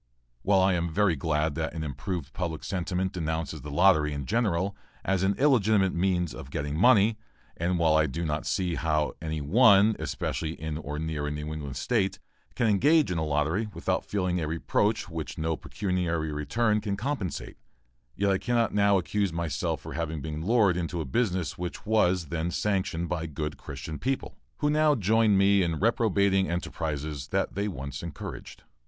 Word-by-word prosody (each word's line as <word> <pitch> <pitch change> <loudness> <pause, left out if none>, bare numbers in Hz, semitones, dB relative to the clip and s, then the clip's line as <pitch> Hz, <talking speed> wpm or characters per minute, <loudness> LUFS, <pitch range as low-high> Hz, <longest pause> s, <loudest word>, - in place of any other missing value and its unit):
While 95 +3 +3
I 95 0 +4
am 85 -1 0
very 95 0 +2
glad 75 +1 0
that 80 0 -3
an 80 - -3
improved 75 0 -4
public 85 -4 -3
sentiment 95 0 -2
denounces 80 -3 -3
the 75 - -8
lottery 75 -1 +4
in 70 -2 -4
general 100 - 0 0.3
as 95 -2 +1
an 95 +1 +2
illegitimate 110 -8 +3
means 90 -2 0
of 65 - -9
getting 75 +1 -3
money, 110 +2 +4 0.4
and 90 +2 0
while 80 -2 +3
I 80 -1 +4
do 85 +5 -3
not 75 0 -2
see 90 -3 0
how 75 -3 0
any 80 -1 -3
one, 105 - +5
especially 80 0 -3
in 80 0 -4
or 75 -1 -5
near 75 -2 -3
a - - -2
New 75 +1 -4
England 70 -4 -6
State, 100 - 0 0.4
can 120 - +1
engage 130 - +4
in 85 - -1
a - - 0
lottery 80 +8 0
without 95 +2 -1
feeling 90 -3 -1
a 80 - -2
reproach 100 +7 0
which 80 -3 -6
no 80 +1 -1
pecuniary 85 -5 -2
return 105 +10 0
can 100 -2 -2
compensate; 120 - -4 0.6
yet 100 0 +1
I 95 - +1
cannot 120 -2 +1
now 100 -1 +4
accuse 95 +1 0
myself 85 -1 -2
for - - -8
having 80 -1 -3
been 75 +2 -5
lured 105 -3 +3
into 85 0 -2
a 80 - -2
business 90 - -1
which 90 +3 -5
was 95 -6 +2
then 85 +1 -1
sanctioned 95 -3 -1
by 85 -2 -2
good 75 0 -4
Christian 80 -1 -7
people, 135 +1 -2 0.2
who 150 - +1
now 150 0 +4
join 110 0 +3
with - - +4
me 100 0 +5
in 85 -2 0
reprobating 100 -3 +2
enterprises 75 -4 -3 0.2
they 100 +1 -2
once 70 -6 -5
encouraged. 85 -2 -8
90 Hz, 180 wpm, -27 LUFS, 80-100 Hz, 0.6 s, one